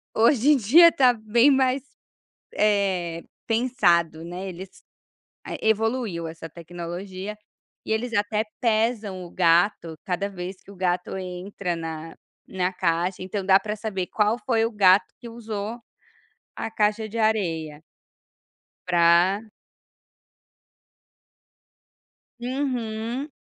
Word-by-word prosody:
hoje 235 +4 +4
em 295 - +5
dia, 310 +10 +7
está 255 -5 +4
bem 230 +4 +3
mais, 265 -1 +2 0.8
eh, 190 -5 +1 0.2
pensado, 175 -9 +2
né. 180 +3 -6
Eles 185 +1 -11 0.6
é, - - -4
evoluiu 220 -6 0
essa 165 0 -8
tecnologia, 175 +4 -7 0.5
e - - -6
eles 230 +2 -1
até 210 0 +1 0.2
pesam 220 -4 0
o 170 - -12
gato 170 -1 +2
cada 190 +2 -2
vez 185 -1 -7
que - - -20
o - - -13
gato 180 0 -1
entra 180 0 -4
na 165 -1 -6 0.3
na 185 -1 -1
caixa. 180 +1 -1
Então 190 +1 -4
dá 190 0 +6
para 210 0 -4
saber, 200 -4 -4
qual 210 +2 +1
foi 225 -3 +2
o 230 - -2
gato 195 -2 +5
que 235 - -9
usou 225 -1 -5 0.8
a 225 - -5
caixa 215 0 0
de 220 +2 -7
areia. 165 -9 -1 1.0
Pra 175 +3 +4 3.0
Uhum, 245 -1 -3
200 Hz, 115 wpm, -24 LUFS, 180-225 Hz, 3.0 s, dia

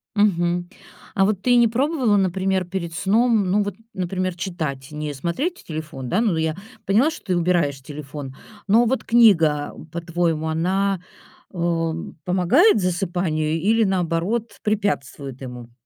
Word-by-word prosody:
Мгм. 175 -3 +1 0.5
А 195 - +4
вот 200 -2 0
ты 245 - +1
и - - +6
не 235 -1 +6
пробовала, 255 -3 +1
например, 190 0 +1
перед 175 -2 -4
сном, 215 +3 +2
ну, 205 +2 +3
вот, 205 -2 -4 0.2
например, 185 0 -2
читать, 155 -7 -4
не 150 -1 -4
смотреть 255 - -3
телефон, 155 -5 -6
да? 190 - +1
Ну 215 -7 +2
да, 160 - -1
я 160 0 0 0.3
поняла, 230 +11 +3
что - - -10
ты 185 -3 +1
убираешь 165 -6 +1
телефон. 140 -1 -8 0.3
Но 230 +4 +5
вот 260 +3 0
книга, 165 -11 +4 0.2
по-твоему, 170 -2 -1
она, 190 +3 0 0.5
э, 165 -2 0 0.3
помогает 190 - +4
засыпанию 175 -4 -1
или, 220 +5 +3
наоборот, 190 +4 -1
препятствует 145 - -2
ему? 125 -2 -8
180 Hz, 145 wpm, -22 LUFS, 160-205 Hz, 0.5 s, и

